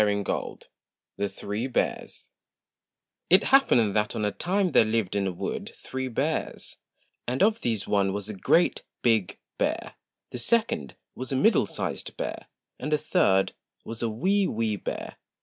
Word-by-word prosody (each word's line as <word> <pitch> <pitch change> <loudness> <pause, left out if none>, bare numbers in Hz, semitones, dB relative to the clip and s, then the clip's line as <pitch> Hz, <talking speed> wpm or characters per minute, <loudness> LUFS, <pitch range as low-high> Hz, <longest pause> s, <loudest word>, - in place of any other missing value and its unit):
N 105 - +4 0.2
193 - - -4 0.5
THE 100 0 -1
THREE 105 +6 -4
BEARS 130 - -2 1.0
T 185 - +9
happened 120 - +4
that 105 0 +1
on 105 - 0
a 105 - +1
time 185 - 0
there - - +6
lived 110 -3 0
in 100 -1 +1
a - - -1
wood 90 - -4
three 130 0 -5
bears; 120 - -2 0.5
and 125 +6 +1
of 220 +2 +3
these 110 -4 -1
one 100 -1 +2
was 100 +1 -4
a 110 - -5
GREAT 165 - +2 0.2
BIG 110 -6 +2 0.2
BEAR, - - -1 0.4
the 125 - -4
second 170 - +1 0.2
was 130 +1 -5
a - - +1
MIDDLE 200 - +4
SIZED - - -4
BEAR, - - -4 0.3
and 150 +4 -4
the 150 - +4
third 145 - +2 0.3
was 115 0 -6
a 115 - 0
WEE 190 - +2
WEE 110 -1 0
BEAR. - - -5
115 Hz, 165 wpm, -27 LUFS, 105-155 Hz, 1.0 s, T